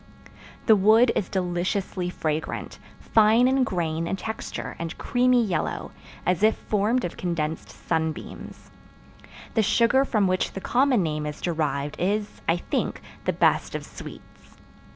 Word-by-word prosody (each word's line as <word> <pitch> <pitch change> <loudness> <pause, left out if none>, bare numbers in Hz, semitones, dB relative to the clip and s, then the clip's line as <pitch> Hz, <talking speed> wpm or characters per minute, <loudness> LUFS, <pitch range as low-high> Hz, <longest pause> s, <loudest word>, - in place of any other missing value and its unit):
The 220 - +7
wood 220 +5 +5
is 195 - -1
deliciously 180 0 -1
fragrant, 155 -3 -3 0.2
fine 225 +3 +4
in 265 0 +3
grain 165 -6 -1
and 195 - -2
texture 220 +2 -5
and 165 -1 -5
creamy 250 -1 +3
yellow, 175 -6 -2 0.3
as 180 0 +1
if 220 +1 +4
formed 215 +3 0
of 175 - -6
condensed 165 -3 -3
sunbeams. 160 -1 -4 0.8
The 225 - +3
sugar 235 +6 +3
from 215 -7 +1
which 185 0 0
the - - -4
common 250 0 +2
name 150 -2 -2
is 150 0 -6
derived 150 -4 -2
is, 205 +3 -1
I 165 - +3
think, - - -2 0.3
the - - +1
best - - +2
of - - -4
sweets. - - -12
190 Hz, 140 wpm, -25 LUFS, 165-220 Hz, 0.8 s, The